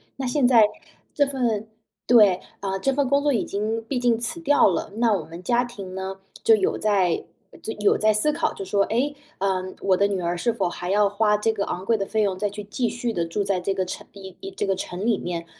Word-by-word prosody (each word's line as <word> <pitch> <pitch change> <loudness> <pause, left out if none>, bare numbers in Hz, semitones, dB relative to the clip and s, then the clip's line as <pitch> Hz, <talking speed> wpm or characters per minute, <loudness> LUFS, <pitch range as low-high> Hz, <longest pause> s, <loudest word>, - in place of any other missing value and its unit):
那 270 - -4
现 250 +1 +2
在 235 -3 +7 0.5
这 285 - +3
份， 235 -6 -1 0.4
对， 210 -6 +6 0.2
呃， 195 -1 -2
这 270 +5 +1
份 275 -2 0
工 280 0 +3
作 290 -1 +2
已 230 - +1
经 215 +3 -2
毕 250 +3 -2
竟 240 -2 +2
辞 240 +8 -1
掉 290 -8 +4
了， 195 +2 -3
那 235 0 +2
我 190 -7 0
们 170 +3 -10
家 240 +3 +2
庭 200 -6 -9
呢， 190 0 -5 0.2
就 225 - +6
有 195 -3 0
在 195 -5 +1 0.5
有 205 - +3
在 215 0 +3
思 215 +9 +2
考， 325 - 0
就 195 - -7
说： 200 +1 +2
“诶， 280 +6 0 0.2
呃， 190 -1 0 0.2
我 190 -1 +2
的 200 +2 +3
女 195 -2 -2
儿 175 0 -1
是 235 +7 +1
否 180 - -1
还 175 +1 -5
要 205 +1 +4
花 210 0 +2
这 220 +2 +1
个 200 - -2
昂 185 - -4
贵 230 +2 +3
的 195 - -1
费 220 +2 0
用 195 -3 0
再 205 +1 -1
去 205 0 -8
继 230 +3 -1
续 240 -1 -3
地 170 -4 0
住 195 +4 -2
在 195 -2 0
这 195 +2 -1
个 190 -1 -1
城 180 - -7
一 190 -1 -11
一 385 0 -7
这 290 - -3
个 195 - +1
城 185 +1 -5
里 230 -3 +2
面， 170 -1 -4
210 Hz, 260 characters per minute, -24 LUFS, 190-240 Hz, 0.5 s, 在